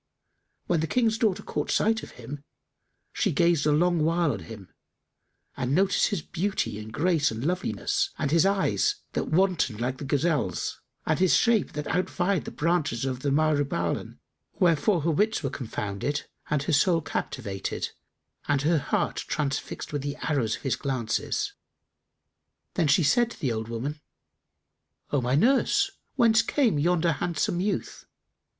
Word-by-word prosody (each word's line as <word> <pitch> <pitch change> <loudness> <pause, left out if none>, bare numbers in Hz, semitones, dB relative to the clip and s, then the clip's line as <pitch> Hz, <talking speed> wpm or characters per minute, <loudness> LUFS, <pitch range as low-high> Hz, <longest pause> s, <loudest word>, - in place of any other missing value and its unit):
When 170 - +1
the 160 - -1
King's 225 0 +1
daughter 210 -5 +1
caught - - -3
sight 220 +1 +2
of - - -11
him, 135 +4 -8 0.7
she 200 - +1
gazed 165 -1 +2
a - - +4
long 170 +1 +3
while 165 -1 +2
on 110 - -4
him 95 +3 -11 0.8
and 130 +1 -1
noticed 195 +2 +3
his 185 -7 -2
beauty 190 - -2
and 110 +1 -8
grace 155 +2 +2
and 110 +4 -5
loveliness 390 - 0
and 140 - -1
his 165 +1 +5
eyes 200 - +2 0.2
that - - -1
wantoned 170 - +1
like 125 +2 -2
the - - -6
gazelle's, 145 +3 -1 0.2
and - - +1
his 185 -1 +4
shape 230 -4 +2
that 150 0 -4
outvied 180 +1 0
the - - -4
branches 150 -7 0
of 130 -2 -2
the 140 - -1
myrobalan; 145 -1 0 0.4
wherefore 175 +1 +3
her 165 +3 +1
wits 210 +3 +1
were 135 - -1
confounded 115 +3 -3 0.2
and 150 -2 +1
her 160 - -1
soul 165 +4 +3
captivated 100 -9 -4 0.6
and 145 -1 +1
her 160 +1 +3
heart - - -1
transfixed 145 0 -3
with 145 - -1
the 145 +1 -3
arrows 130 -8 +1
of - - -12
his 135 - +1
glances. 135 - -2 1.2
Then 165 -4 +1
she 145 +4 +4
said 230 +12 +3
to - - -12
the 130 - 0
old 110 -1 -3
woman, 135 +6 -4 1.1
"O 145 - +2
my 125 +2 +1
nurse, 275 - +3 0.2
whence 230 -4 +5
came 240 - +1
yonder 170 +2 +2
handsome 170 +3 -1
youth?" 205 +2 -3
155 Hz, 155 wpm, -27 LUFS, 135-185 Hz, 1.2 s, his